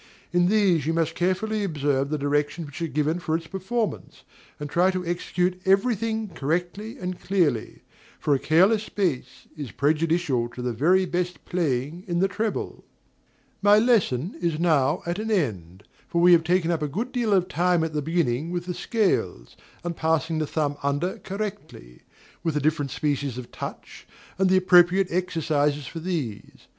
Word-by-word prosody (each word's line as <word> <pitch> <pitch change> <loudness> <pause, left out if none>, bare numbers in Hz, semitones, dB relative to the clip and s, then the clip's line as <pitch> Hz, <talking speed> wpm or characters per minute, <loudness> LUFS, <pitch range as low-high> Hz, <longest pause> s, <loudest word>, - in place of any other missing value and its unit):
In 175 0 +4
these 185 -7 +3
you 165 - +1
must 165 -1 0
carefully 195 +5 0
observe 145 -6 0
the 155 - -1
directions 145 +3 -1
which 145 +3 -9
are 165 - 0
given 155 +3 0
for 160 -2 -1
its 165 - -10
performance, 200 +6 -4 0.4
and 150 - -4
try 175 +5 +3
to 185 -1 -2
execute 180 +1 -1
every 195 +6 +3
thing 220 0 -2
correctly 175 - -3
and 180 -6 -5
clearly; 165 - 0 0.4
for 145 - +1
a 135 - +2
careless 195 +9 +3
bass 175 -11 -2
is 145 -5 -6
prejudicial 150 -4 +1
to 125 - -6
the 125 -1 -1
very 180 - +3
best 180 0 -3
playing 160 -1 -2
in 175 -1 -1
the 190 +3 +3
treble. 215 +2 -3 0.8
My 205 +1 +6
lesson 205 - +2
is 170 -3 0
now 155 -2 +2
at 175 +3 -2
an 220 +1 -3
end; 100 - -2 0.2
for 170 - -1
we 175 +1 +6
have 170 -2 +6
taken 175 0 +1
up 165 -2 -1
a 150 - 0
good 220 - -3
deal 240 -4 0
of 185 -2 +3
time 175 -1 +1
at 160 -1 -3
the 150 - -1
beginning 160 -2 0
with 175 0 -3
the 180 - -3
scales, 170 - -1 0.3
and 175 -1 -3
passing 160 0 0
the 155 - -1
thumb 145 -2 -1
under 145 +6 -1
correctly, 190 - -7 0.4
with 165 -3 -1
the - - +2
different 150 -1 0
species 145 -2 -2
of 125 -1 -8
touch, - - -8 0.3
and 190 -1 +3
the 190 - +5
appropriate 185 0 +5
exercises 150 -5 0
for 165 - -7
these. 155 - -5
170 Hz, 175 wpm, -25 LUFS, 145-185 Hz, 0.8 s, My